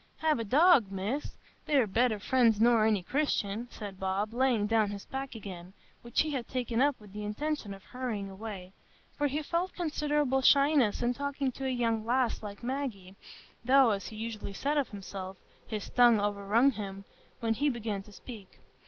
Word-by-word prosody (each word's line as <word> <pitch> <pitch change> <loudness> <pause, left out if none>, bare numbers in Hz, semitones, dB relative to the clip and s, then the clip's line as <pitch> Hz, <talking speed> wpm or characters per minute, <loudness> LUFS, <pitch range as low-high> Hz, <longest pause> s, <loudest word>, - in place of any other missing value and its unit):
"Hev 310 -4 +1
a - - -1
dog, 265 - +5
Miss!—they're 255 +5 -2
better 225 +2 +1
friends 230 0 +3
nor 230 -1 +5
any 210 -4 +1
Christian," 235 -3 -1
said 200 -5 -8
Bob, 195 +3 -1
laying 245 -4 +2
down 215 -1 +2
his 200 -1 -7
pack 270 -1 -5
again, 185 -4 -9 0.3
which 235 -1 0
he 310 - -1
had 255 -5 -3
taken 245 -2 -1
up 285 -1 +2
with 205 -2 -15
the 210 0 -5
intention 230 +2 -3
of 195 -1 -9
hurrying 240 -6 -4
away; 195 -2 -8 0.4
for 290 - +1
he 295 +3 -2
felt 345 +5 -1
considerable 295 -5 0
shyness 275 -5 +4
in 240 +1 +2
talking 280 0 -2
to 265 +2 -5
a - - 0
young 230 -3 0
lass 245 +1 +1
like 205 +1 -8
Maggie, 240 -8 -4 0.5
though, 260 -1 +5
as 200 -1 -2
he 220 - -9
usually 215 -2 -5
said 285 +8 -1
of 285 -3 +1
himself, 195 -2 -7 0.3
"his 215 -2 -4
tongue 240 -3 +6
overrun 205 +5 +2
him" 195 -3 -7 0.3
when 225 -2 +1
he 290 +6 +1
began 225 -5 -3
to 210 - -16
speak. 205 -2 -11
230 Hz, 180 wpm, -30 LUFS, 205-270 Hz, 0.5 s, tongue